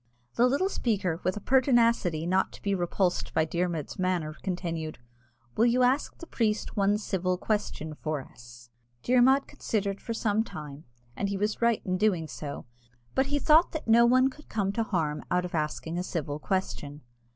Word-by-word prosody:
The 245 Hz, -, +4 dB
little 280 Hz, +9 st, +1 dB
speaker, 195 Hz, -, -1 dB
with 185 Hz, +3 st, 0 dB
a -, -, -3 dB
pertinacity 235 Hz, -, +3 dB
not 185 Hz, +2 st, +1 dB
to -, -, -12 dB
be 200 Hz, -, 0 dB
repulsed 180 Hz, 0 st, -1 dB
by 160 Hz, -, +3 dB
Dermod's 170 Hz, -2 st, -3 dB
manner, 175 Hz, -4 st, -1 dB
continued, 170 Hz, -4 st, -3 dB, 0.6 s
"Will 230 Hz, -, +4 dB
you 250 Hz, +1 st, +3 dB
ask 260 Hz, +4 st, +1 dB
the 335 Hz, -, -9 dB
priest 220 Hz, -8 st, -1 dB
one 205 Hz, 0 st, +3 dB
civil 185 Hz, -3 st, -1 dB
question 180 Hz, -7 st, -2 dB
for 155 Hz, 0 st, -3 dB
us?" 120 Hz, -2 st, -14 dB, 0.3 s
Dermod 255 Hz, +2 st, +4 dB
considered 200 Hz, -2 st, -3 dB
for 230 Hz, -, -4 dB
some 220 Hz, -1 st, +1 dB
time, 150 Hz, -6 st, -9 dB, 0.3 s
and 200 Hz, -, -2 dB
he 200 Hz, -, -2 dB
was 210 Hz, +3 st, -1 dB
right 235 Hz, -1 st, +2 dB
in 185 Hz, -1 st, -1 dB
doing 185 Hz, -7 st, +1 dB
so, 140 Hz, +2 st, -7 dB, 0.5 s
but 265 Hz, 0 st, +2 dB
he 290 Hz, +1 st, 0 dB
thought 310 Hz, +4 st, +4 dB
that 315 Hz, -, -5 dB
no 235 Hz, +1 st, +6 dB
one 255 Hz, +2 st, +4 dB
could 300 Hz, +3 st, -17 dB
come 200 Hz, -3 st, 0 dB
to 230 Hz, -, -1 dB
harm 160 Hz, -8 st, -1 dB
out 180 Hz, 0 st, +1 dB
of 180 Hz, -, -7 dB
asking 160 Hz, +2 st, -2 dB
a -, -, -2 dB
civil 150 Hz, -5 st, -3 dB
question. 150 Hz, -5 st, -3 dB
190 Hz, 180 wpm, -28 LUFS, 160-235 Hz, 0.6 s, no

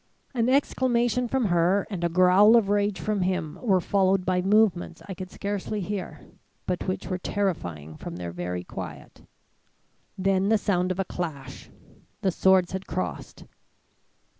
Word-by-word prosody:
"An 235 Hz, -1 st, +1 dB
exclamation 250 Hz, -3 st, +1 dB
from 260 Hz, 0 st, 0 dB
her 180 Hz, +2 st, +2 dB
and 190 Hz, -5 st, -5 dB
a 170 Hz, -, +2 dB
growl 185 Hz, +5 st, +6 dB
of 220 Hz, -4 st, +3 dB
rage 205 Hz, -2 st, +1 dB
from 210 Hz, +4 st, -1 dB
him 180 Hz, -4 st, -2 dB
were 195 Hz, -6 st, +3 dB
followed 190 Hz, 0 st, +1 dB
by 180 Hz, 0 st, +1 dB
movements 190 Hz, -4 st, +2 dB
I 195 Hz, -, -5 dB
could 185 Hz, 0 st, -7 dB
scarcely 205 Hz, +2 st, -4 dB
hear, 185 Hz, -5 st, -5 dB, 0.4 s
but 180 Hz, +1 st, -2 dB
which 185 Hz, -, -2 dB
were 185 Hz, -1 st, -3 dB
terrifying 90 Hz, -, -3 dB
from 85 Hz, -, -7 dB
their 85 Hz, -1 st, -5 dB
very 90 Hz, +1 st, -4 dB
quiet. -, -, -9 dB, 1.0 s
Then 195 Hz, +1 st, +1 dB
the 220 Hz, -, +5 dB
sound 185 Hz, -3 st, 0 dB
of 185 Hz, -, -3 dB
a 195 Hz, -, 0 dB
clash. 140 Hz, -8 st, -6 dB, 0.5 s
The 190 Hz, -, +1 dB
swords 185 Hz, 0 st, +3 dB
had 190 Hz, 0 st, -5 dB
crossed. -, -, -5 dB
190 Hz, 155 wpm, -26 LUFS, 175-205 Hz, 1.0 s, growl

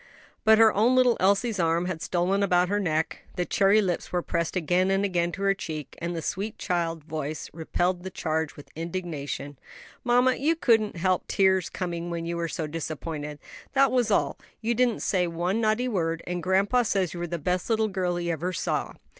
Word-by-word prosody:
But 220 Hz, -1 st, +6 dB
her 225 Hz, -1 st, +6 dB
own 230 Hz, +5 st, +3 dB
little 250 Hz, -2 st, +5 dB
Elsie's 200 Hz, +3 st, +2 dB
arm 165 Hz, +1 st, +2 dB
had 180 Hz, -3 st, -4 dB
stolen 185 Hz, +4 st, 0 dB
about 180 Hz, -2 st, +3 dB
her 205 Hz, +1 st, +1 dB
neck, 160 Hz, -4 st, -1 dB, 0.2 s
the 180 Hz, -1 st, -1 dB
cherry 200 Hz, +3 st, +4 dB
lips 180 Hz, -3 st, -2 dB
were 175 Hz, 0 st, 0 dB
pressed 170 Hz, +1 st, -2 dB
again 180 Hz, +2 st, +2 dB
and 195 Hz, +1 st, +2 dB
again 175 Hz, -3 st, 0 dB
to 200 Hz, -, -4 dB
her 195 Hz, 0 st, +4 dB
cheek, 155 Hz, -7 st, -6 dB
and 170 Hz, +1 st, -3 dB
the 165 Hz, -, -4 dB
sweet 205 Hz, +7 st, -3 dB
child 170 Hz, -4 st, -2 dB
voice 155 Hz, -1 st, -5 dB
repelled 175 Hz, +3 st, -1 dB
the 190 Hz, -, -6 dB
charge 160 Hz, -3 st, -2 dB
with 145 Hz, -, -13 dB
indignation. 160 Hz, -5 st, -5 dB, 0.4 s
"Mamma, 250 Hz, +1 st, +3 dB
you 310 Hz, +5 st, +2 dB
couldn't 220 Hz, -, +2 dB
help 185 Hz, +1 st, 0 dB
the -, -, -4 dB
tears 190 Hz, -2 st, +3 dB
coming 175 Hz, -2 st, -4 dB
when 170 Hz, -1 st, -3 dB
you 170 Hz, 0 st, -2 dB
were 170 Hz, 0 st, -1 dB
so 160 Hz, -1 st, -3 dB
disappointed; 150 Hz, -1 st, -5 dB
and -, -, -39 dB, 0.3 s
that 275 Hz, -1 st, +4 dB
was 245 Hz, -3 st, +2 dB
all. 205 Hz, -, +1 dB, 0.2 s
You 230 Hz, +1 st, 0 dB
didn't 240 Hz, -1 st, +1 dB
say 180 Hz, -3 st, +1 dB
one 175 Hz, +6 st, -1 dB
naughty 220 Hz, +3 st, +1 dB
word. 165 Hz, -7 st, -1 dB
And 175 Hz, 0 st, -3 dB
grandpa 195 Hz, +7 st, +3 dB
says 195 Hz, -6 st, 0 dB
you 175 Hz, -, -6 dB
were 175 Hz, -, -2 dB
the 170 Hz, +1 st, -3 dB
best 180 Hz, +5 st, -1 dB
little 220 Hz, -1 st, +2 dB
girl 185 Hz, -3 st, -1 dB
he 175 Hz, 0 st, -1 dB
ever 175 Hz, +3 st, -2 dB
saw." -, -, -2 dB
180 Hz, 205 wpm, -26 LUFS, 170-205 Hz, 0.4 s, But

